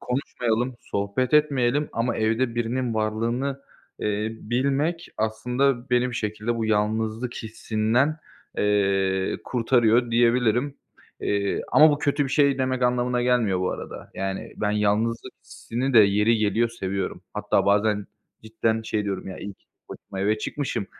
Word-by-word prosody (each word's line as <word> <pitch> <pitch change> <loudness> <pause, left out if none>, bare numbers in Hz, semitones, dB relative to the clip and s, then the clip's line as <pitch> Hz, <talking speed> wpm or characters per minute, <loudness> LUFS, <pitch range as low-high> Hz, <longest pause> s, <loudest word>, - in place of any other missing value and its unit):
konuşmayalım, 125 -1 -1
sohbet 100 +7 -1
etmeyelim 145 -2 +2
ama 115 +1 -1
evde 115 +2 0
birinin 120 +1 -1
varlığını, 115 +6 -1 0.4
eee, 105 +1 -1
bilmek 140 +8 -1
aslında 125 +4 0
beni 125 0 +3
bir - - -7
şekilde 110 +2 -2
bu 115 - -1
yalnızlık 110 +3 0
hissinden, 115 +6 0 0.4
eee, 95 -2 +1
kurtarıyor 120 -1 +2
diyebilirim. 120 +3 +2 0.4
Eee, 100 -1 -1
ama 155 +1 +8
bu 145 - 0
kötü 145 0 +1
bir - - -3
şey 140 -1 +3
demek 130 -1 0
anlamına 125 0 +1
gelmiyor 120 -7 +2
bu 90 - 0
arada. - - -8
Yani, 95 0 -4
ben 105 - 0
yalnızlık 105 +2 0
hissini 130 +4 -4
de - - +9
yeri 105 +2 +4
geliyor 110 +2 +2
seviyorum. 95 -4 -4
Hatta - - +1
bazen 105 0 +2 0.4
cidden 110 0 -1
şey 110 -1 -2
diyorum: 100 -1 -4
"Ya, 95 - -7
iyi 100 -1 -7
ki - - -39
tek - - -59
başıma 95 - -8
eve 105 +2 +1
çıkmışım. 130 -5 -3
115 Hz, 145 wpm, -24 LUFS, 105-125 Hz, 0.4 s, de